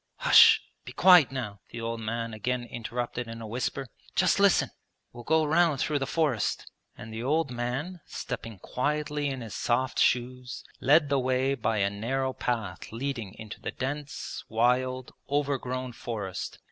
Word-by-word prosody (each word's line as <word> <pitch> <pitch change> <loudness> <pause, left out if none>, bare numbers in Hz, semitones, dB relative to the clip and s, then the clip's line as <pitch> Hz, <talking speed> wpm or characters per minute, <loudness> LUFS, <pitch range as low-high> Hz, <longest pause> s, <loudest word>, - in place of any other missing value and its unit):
'Hush... 455 -3 +8 0.2
be - - -9
quiet 180 -8 +7
now!' 115 -7 -5
the 115 - -7
old 115 0 -3
man 115 +1 -3
again 120 +3 -2
interrupted 120 0 -4
in 115 0 -7
a 115 - -7
whisper: 125 +4 -3 0.3
'just - - +3
listen, - - +4 0.4
we'll 120 0 -9
go 160 +4 +3
round 160 -2 +3
through 150 0 0
the 135 - -2
forest.' 145 -10 0 0.3
And 110 0 -9
the 110 - -4
old 145 +2 +1
man, 130 +9 -3
stepping 115 -3 -6
quietly 145 +6 -1
in 135 -2 -4
his 110 -3 -7
soft 130 +2 0
shoes, 125 +1 0 0.2
led 145 +2 +4
the 140 -1 +2
way 130 +1 +1
by 115 -4 -1
a 100 -1 +2
narrow 130 +6 -1
path 110 -9 -3
leading 115 -4 -4
into 110 -2 -9
the - - -3
dense, 145 +2 -5
wild, 125 +3 +1 0.2
overgrown 130 -3 -1
forest. 105 -6 -5
125 Hz, 160 wpm, -28 LUFS, 115-140 Hz, 0.4 s, Hush